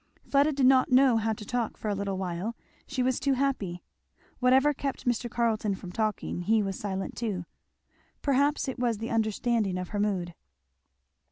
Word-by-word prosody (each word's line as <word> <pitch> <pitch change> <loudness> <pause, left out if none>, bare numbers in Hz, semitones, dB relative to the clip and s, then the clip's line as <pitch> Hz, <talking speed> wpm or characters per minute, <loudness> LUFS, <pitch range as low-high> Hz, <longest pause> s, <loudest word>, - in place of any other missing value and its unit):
Fleda 285 +2 +4
did 275 -2 +1
not 260 0 +5
know 255 -2 +6
how 225 0 0
to 210 -1 -5
talk 240 0 -2
for - - -6
a 210 - +1
little 200 -1 -2
while; 185 +4 -3 0.3
she 265 -3 -1
was 255 0 +1
too 275 0 +2
happy. 250 -10 -1 0.6
Whatever 265 +4 +4
kept 275 -1 -4
Mr. 240 0 0
Carleton 220 -3 0
from 185 -2 -9
talking, 215 -3 -2
he 215 +4 +2
was 195 -1 -3
silent 195 +2 -4
also. 195 -7 -2 0.8
Perhaps 285 +1 +2
it 260 -1 -4
was 240 -3 +1
the 225 +2 -5
understanding 220 -2 0
of 180 -1 -4
her 205 - -3
mood. 190 -4 -1
225 Hz, 175 wpm, -28 LUFS, 200-255 Hz, 0.8 s, know